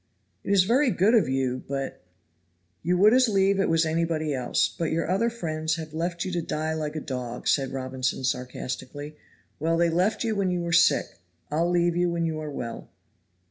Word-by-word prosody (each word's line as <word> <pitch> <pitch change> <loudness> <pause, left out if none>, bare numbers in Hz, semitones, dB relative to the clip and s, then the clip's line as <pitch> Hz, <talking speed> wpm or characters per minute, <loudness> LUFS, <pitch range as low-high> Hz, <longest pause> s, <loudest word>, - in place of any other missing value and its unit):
"It - - -7
is 195 -2 +5
very 250 +8 +3
good 210 +1 +3
of 225 - +4
you, 130 -1 -1
but 135 -1 -4 0.4
" 90 +1 -44
"You 180 +2 +1
would 210 +4 +6
as 255 -1 +5
lieve 195 -1 +2
it 195 - +2
was 165 0 +3
anybody 160 -1 0
else; 125 -2 +1
but 165 -2 -1
your 165 +1 0
other 195 +7 +1
friends 160 -8 -2
have 160 -2 -7
left 170 +2 -2
you 185 - -3
to 175 -1 -1
die 155 0 -2
like 155 -1 -3
a - - -1
dog," 125 -4 -5
said 135 -2 +2
Robinson 130 0 -2
sarcastically. 130 +3 -4 0.4
"Well, 165 +2 +1
they 170 0 +3
left 185 +8 +1
you 225 -2 0
when 195 -2 +1
you 180 -1 -1
were 170 -1 -2
sick 170 - +3 0.3
I'll 165 +3 +1
leave 175 -1 +2
you 175 0 +2
when 170 -1 -1
you 160 -1 -2
are 155 -1 -5
well." 120 -5 -6
160 Hz, 205 wpm, -26 LUFS, 135-180 Hz, 0.4 s, would